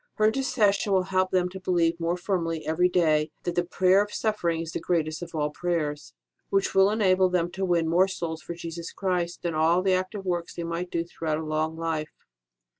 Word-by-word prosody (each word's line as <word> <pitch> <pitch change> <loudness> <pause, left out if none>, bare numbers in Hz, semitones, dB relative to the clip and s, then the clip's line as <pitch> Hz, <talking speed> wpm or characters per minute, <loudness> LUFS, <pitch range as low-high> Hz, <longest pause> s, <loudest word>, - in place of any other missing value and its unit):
Her 215 - +2
inter 220 +5 +2
cession 210 -6 +2
will 190 -1 +3
help 185 0 +3
them 180 -1 +2
to 190 +1 -8
believe 170 -2 +1
more 170 +1 0
firmly 170 -3 -2
every 175 +3 +2
day 155 -4 +2
that 175 - -2
the 175 - +1
prayer 185 +2 +3
of 210 - -10
suffering 175 -8 -1
is 165 0 -5
the - - -3
greatest 160 -2 -1
of 170 -1 -7
all 150 -1 0
prayers, 150 - -3 0.3
which 195 0 +1
will 195 +1 +5
enable 190 -3 +3
them 175 -1 0
to 190 +2 -4
win 175 -3 +2
more 175 +4 +4
souls 170 -4 -4
for 170 - -7
Jesus 170 0 -6
Christ 180 -2 -2
than 170 -1 -1
all 165 +3 +3
the 190 -1 +3
active 185 +2 -2
works 175 -2 -2
they 170 - -4
might 170 +2 -3
do 165 -1 -1
throughout 160 -2 -3
a 160 - -4
long 155 +1 -1
life. 160 -2 -2
175 Hz, 215 wpm, -26 LUFS, 165-185 Hz, 0.3 s, will